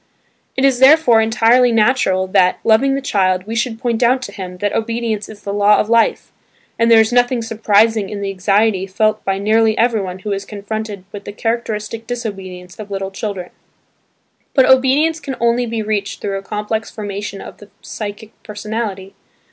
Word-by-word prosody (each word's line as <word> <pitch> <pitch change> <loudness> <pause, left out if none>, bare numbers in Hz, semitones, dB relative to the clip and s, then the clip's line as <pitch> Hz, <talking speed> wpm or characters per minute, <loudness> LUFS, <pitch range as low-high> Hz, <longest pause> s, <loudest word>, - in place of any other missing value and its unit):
It 265 - +2
is 265 -3 +2
therefore 265 -4 +6
entirely 230 +2 +3
natural 215 -5 +2
that, 185 -1 +2
loving 250 +5 +3
the 275 - -2
child, 185 -6 0
we 220 - -6
should 230 0 -1
point 235 -1 -2
out 255 +2 +2
to - - -7
him 180 -2 -8
that 205 +2 -2
obedience 225 -2 -2
is 210 -1 -12
the 200 - -4
law 205 +1 +4
of 215 - -1
life, 230 -1 +2 0.5
and 230 0 +3
there 230 -1 +7
is 220 +2 +2
nothing 245 -1 +2
surprising 220 -1 +2
in 210 - -5
the 200 -1 -3
anxiety 195 +1 +1
felt 215 +2 0
by 195 0 -1
nearly 220 +2 +2
everyone 215 -6 0
who 205 +2 -6
is 195 0 -2
confronted 210 0 -6
with 200 -1 -9
the - - -6
characteristic 225 0 -3
disobedience 190 -6 -7
of 210 -1 -8
little 195 -1 -4
children. 195 -3 -5 1.0
But 265 -3 +5
obedience 270 +5 +3
can 270 -3 -6
only 235 +1 +1
be 225 -1 -3
reached 205 -2 -3
through 195 -1 -3
a - - -10
complex 210 +2 -4
formation 205 -1 -6
of - - -10
the 205 - -15
psychic 210 0 -7
personality. 210 -2 -5
215 Hz, 180 wpm, -17 LUFS, 200-230 Hz, 1.0 s, there